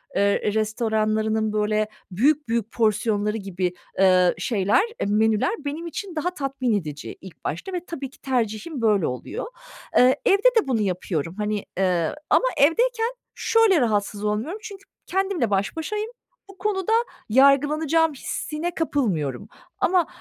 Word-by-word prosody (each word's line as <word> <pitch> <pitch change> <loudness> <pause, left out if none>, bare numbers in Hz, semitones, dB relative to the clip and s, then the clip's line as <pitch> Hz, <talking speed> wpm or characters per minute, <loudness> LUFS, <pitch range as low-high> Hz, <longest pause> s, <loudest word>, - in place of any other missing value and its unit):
eee, 200 +1 +2
restoranlarının, 220 0 0
böyle, 215 0 +1 0.2
büyük 285 +9 +2
büyük 230 -1 -1
porsiyonları 215 -1 +1
gibi, 185 -3 -3 0.3
ııı, 185 -2 +5
şeyler, 205 - +2 0.3
menüler 215 - +2
benim 315 +4 -4
için 360 +1 -6
daha 315 +4 0
tatmin 270 -6 -1
edici 150 -2 -8
ilk 190 -2 -13
başta 170 - -4
ve 355 0 -4
tabii 275 -5 -6
ki - - -22
tercihim 250 +2 -2
böyle 210 -6 +3
oluyor. 125 - -5 0.5
Iıı, 255 +1 +6
evde 400 -1 +4 0.2
de 405 - -3
bunu 230 -5 +1
yapıyorum, 180 -3 -2
hani. 210 -1 -2
Eee, 180 - +1
ama - - +4
evdeyken 460 - +3 0.2
şöyle 440 - +3
rahatsız 210 -2 0
olmuyorum, 220 - -2
çünkü 400 -3 -9 0.2
kendimle 380 - 0
baş 195 0 0
başayım; 425 +7 -3 0.4
bu 390 - -14
konuda 385 0 -1 0.4
yargılanacağım 295 +5 +4
hissine 315 +5 -4
kapılmıyorum. 200 - -1 0.3
Ama 360 -2 +3
230 Hz, 135 wpm, -24 LUFS, 205-325 Hz, 0.5 s, Iıı